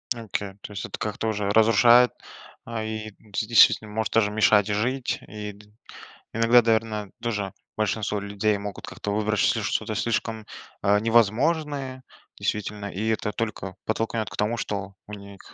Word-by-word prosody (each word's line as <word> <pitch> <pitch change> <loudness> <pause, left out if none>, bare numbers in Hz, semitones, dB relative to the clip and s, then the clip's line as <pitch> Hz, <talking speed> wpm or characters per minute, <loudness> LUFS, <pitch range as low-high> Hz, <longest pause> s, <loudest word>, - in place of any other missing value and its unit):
Окей, 105 -3 -4
то - - -9
есть 100 -1 -5
это - - -6
как-то 110 +1 -3
уже 105 -2 -1
разрушает, 115 +3 +6 0.5
а, 115 -1 -4
и 110 0 -5
де 105 0 -4
действительно 110 -2 +5
может 110 0 -2
даже 105 -2 +3
мешать 105 -1 +4
жить. 120 +5 -1
И 105 +1 -6
д 105 +1 -17 0.7
Иногда, 115 +2 +5
наверно, 110 -2 0
тоже 105 -5 -2 0.3
большинство 105 -1 0
людей 100 +1 0
могут 100 0 -7
как-то 105 - -5
выбрать 105 0 0
чл - - +2
что-то - - -1
слишком, 115 -1 -2 0.4
э, 100 0 +4
невозможное. 130 +5 +1 0.4
Действительно, 105 0 -3
и 105 +5 -3
это 110 -1 -1
только 100 -4 -4
подтолкнет 110 0 -1
к - - -10
тому, 105 +3 0
что 100 -2 -4
у 105 - -11
них 100 -1 -11
110 Hz, 155 wpm, -25 LUFS, 105-115 Hz, 0.7 s, разрушает